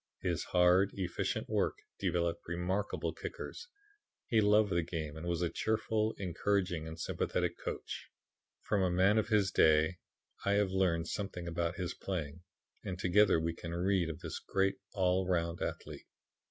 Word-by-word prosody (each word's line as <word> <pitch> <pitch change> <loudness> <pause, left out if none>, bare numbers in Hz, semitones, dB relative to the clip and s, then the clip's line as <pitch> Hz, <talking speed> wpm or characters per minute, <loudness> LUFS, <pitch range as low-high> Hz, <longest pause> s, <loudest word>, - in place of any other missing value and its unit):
His - - -1
hard, 90 +2 +4
efficient 90 -3 -2
work - - 0 0.2
developed 85 -1 -1
remarkable 90 +4 -1
kickers. 365 - -7 0.6
He 110 -2 +3
loved 105 0 +4
the 85 - +2
game 80 -3 -4
and 80 +2 -6
was 85 0 0
a 85 - +1
cheerful, 110 0 0
encouraging 90 -2 -1
and 80 0 -8
sympathetic - - -1
coach. - - -5 0.5
From 105 -2 0
a 95 - +3
man 95 +5 +4
of 110 - -1
his 105 -4 +3
day 80 +1 +4 0.5
I 100 - +2
have 100 -2 +2
learned 85 -4 +1
something 90 -4 -4
about 85 0 -1
his 90 -1 -3
playing, 85 -4 -4 0.4
and 90 -2 -4
together 95 0 +4
we 80 +1 -1
can 85 0 -6
read 90 -1 +1
of 80 - -6
this - - -5
great 95 0 0 0.2
all 95 -1 +2
round 85 -2 0
athlete. - - -5
90 Hz, 155 wpm, -33 LUFS, 85-100 Hz, 0.6 s, hard